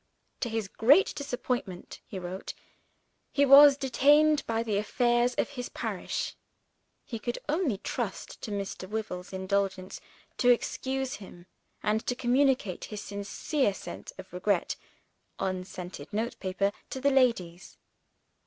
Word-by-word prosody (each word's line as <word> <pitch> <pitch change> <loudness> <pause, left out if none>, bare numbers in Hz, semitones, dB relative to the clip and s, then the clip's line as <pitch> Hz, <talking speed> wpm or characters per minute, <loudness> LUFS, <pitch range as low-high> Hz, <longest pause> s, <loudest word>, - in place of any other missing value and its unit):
To 240 - -1
his 220 -2 -2
great 275 - +4
disappointment 245 -9 -4
(he 195 - -7
wrote) 185 +1 -6 0.8
he 285 - +3
was 280 +1 +9
detained 290 +2 +4
by 225 0 0
the 215 -3 0
affairs 240 +3 +2
of - - 0
his 250 -4 -6
parish. - - -3 0.7
He 230 - -5
could 240 +2 -3
only 300 - +1
trust - - -4
to - - -5
Mr. 200 -2 -4
Wyvil's 200 -4 -4
indulgence 190 0 -2 0.4
to 245 - +4
excuse 265 +2 0
him, 175 -3 -12 0.4
and 215 +1 +1
to 245 - +1
communicate 250 -6 +1
his 210 -1 -7
sincere 205 +4 -1
sense - - -8
of - - -11
regret - - 0 0.6
(on 185 -1 -2
scented 175 -5 -8
note 230 +3 -2
paper) 195 +1 0 0.2
to 265 - -4
the 280 +2 +3
ladies. 230 -10 +1
230 Hz, 135 wpm, -29 LUFS, 195-265 Hz, 0.8 s, was